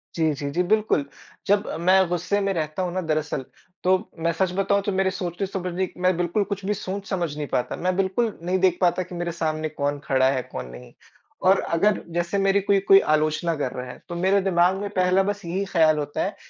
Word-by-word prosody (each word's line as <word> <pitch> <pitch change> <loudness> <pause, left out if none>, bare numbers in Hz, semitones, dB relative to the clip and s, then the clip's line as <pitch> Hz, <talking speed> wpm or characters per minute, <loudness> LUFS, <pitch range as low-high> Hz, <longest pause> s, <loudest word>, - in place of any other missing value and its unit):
जी, 160 -2 +2
जी, 145 0 -4
जी, 175 +5 +1
बिल्कुल। 210 -6 +1 0.4
जब 205 +1 +2
मैं 185 +2 +4
गुस्से 175 +4 0
में 195 0 0
रहता 155 +1 -2
हूँ 175 -1 -3
ना 185 - -1
दरअसल, 155 -4 -2 0.4
तो 185 0 +2
मैं 165 +1 +1
सच 185 +2 0
बताऊँ 200 +1 +2
तो 205 - -1
मेरे 190 0 +1
सोचने-समझने 185 0 -3
मैं 185 0 +3
बिल्कुल 175 +4 +1
कुछ 200 -1 -5
भी 205 - +1
सोच-समझ 190 -5 -3
नहीं 150 -2 -3
पाता। 125 - -1
मैं 180 +1 -1
बिल्कुल 195 +4 0
नहीं 185 +2 0
देख 185 -1 +3
पाता 180 0 +2
कि 180 0 -10
मेरे 175 0 -2
सामने 155 -2 -2
कौन 145 -1 -2
खड़ा 130 -1 +3
है? 130 -2 -1
कौन 65 0 -5
नहीं? 60 0 -12 0.5
और 190 +1 +4 0.2
अगर 210 +4 +2
जैसे 175 +3 -1
मेरी 195 0 +3
कोई 200 0 +3
कोई 195 - +9
आलोचना 155 +1 +1
कर 140 -4 -2
रहा 125 0 -6
है, - - -13
तो 175 - -4
मेरे 190 +3 +2
दिमाग़ 185 0 +2
में 205 +1 -4
पहला 185 0 +2
बस 205 -1 -3
यही 180 +4 -2
ख्याल 160 -4 +3
होता 145 -1 -2
है - - -3
180 Hz, 215 wpm, -24 LUFS, 160-195 Hz, 0.5 s, कोई